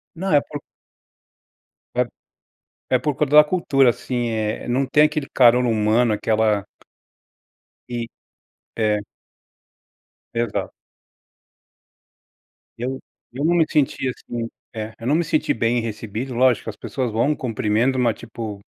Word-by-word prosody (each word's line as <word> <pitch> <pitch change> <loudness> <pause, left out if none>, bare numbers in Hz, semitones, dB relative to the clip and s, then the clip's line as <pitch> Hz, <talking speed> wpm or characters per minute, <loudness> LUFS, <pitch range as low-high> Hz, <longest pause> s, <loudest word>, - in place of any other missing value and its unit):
Não 190 +2 -2
é 145 - +6
por 145 0 -8 1.4
É - - +3 0.9
é 130 - +4
por 145 +3 -1
culpa 150 +1 +1
da 150 - +10
cultura, 140 -6 +3
assim, 120 0 -3
eh, 110 -1 -2
não 130 +3 +1
tem 150 - +4
aquele 155 -2 0
calor 125 0 +6
humano, 110 +1 +2
aquela 110 -1 +1 1.3
E 120 -1 -3 0.7
é. 105 -2 +1 1.4
Exato. 120 0 -2 2.1
Eu 130 +3 -3 0.3
eu 135 +4 -3
não 170 +2 +3
me 170 -2 +4
senti 135 -2 +1
assim 120 -2 -5 0.3
é 110 0 -5
eu 115 - -8
não 145 - +3
me 170 +2 +2
senti 155 -1 +1
bem 115 +1 +1
recebido. 115 +3 -5
Lógico, 125 -2 +2
as 105 - -12
pessoas 125 -5 -3
vão, 125 +7 +2
cumprimentam, 120 +2 0
mas 115 -3 +1
tipo 110 -3 -7
120 Hz, 130 wpm, -22 LUFS, 110-135 Hz, 2.1 s, da